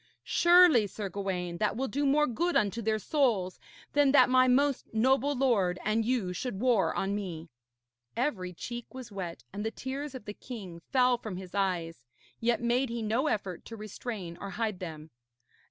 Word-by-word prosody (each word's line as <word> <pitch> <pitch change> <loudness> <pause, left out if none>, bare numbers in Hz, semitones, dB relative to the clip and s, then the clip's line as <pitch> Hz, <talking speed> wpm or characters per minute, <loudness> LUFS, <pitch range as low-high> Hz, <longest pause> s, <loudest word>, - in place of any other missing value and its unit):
Surely, 345 - +6
Sir 200 +1 -5
Gawaine, 180 -2 -3
that 210 +1 0
will 265 +2 -1
do 285 +5 0
more 300 +2 +4
good 340 +8 -1
unto 210 +3 +1
their 220 0 +1
souls 215 -7 0 0.3
than 290 -2 +4
that 275 - +6
my 255 0 +5
most 275 +2 +2
noble 265 +5 +2
lord 215 -9 +2
and 215 +2 +2
you 220 -6 0
should 195 +1 -4
war 240 -4 +3
on 195 +1 -1
me.' 175 -5 -5 0.7
Every 225 -9 -1
cheek 240 +8 -7
was 255 -4 -8
wet 180 -4 -6
and 205 +1 -4
the 220 - 0
tears 270 +4 -5
of 250 - -8
the 205 - -5
king 195 -9 -9
fell 250 -2 +4
from 215 -6 -6
his 185 -1 -9
eyes, 175 -8 -1 0.4
yet 235 +1 +1
made 245 +2 +1
he 235 -1 -3
no 230 +7 +1
effort 195 - -2
to 230 - -8
restrain 210 -4 -6
or 200 - -5
hide 215 -2 -2
them. 160 -3 -8
220 Hz, 180 wpm, -30 LUFS, 190-255 Hz, 0.7 s, Surely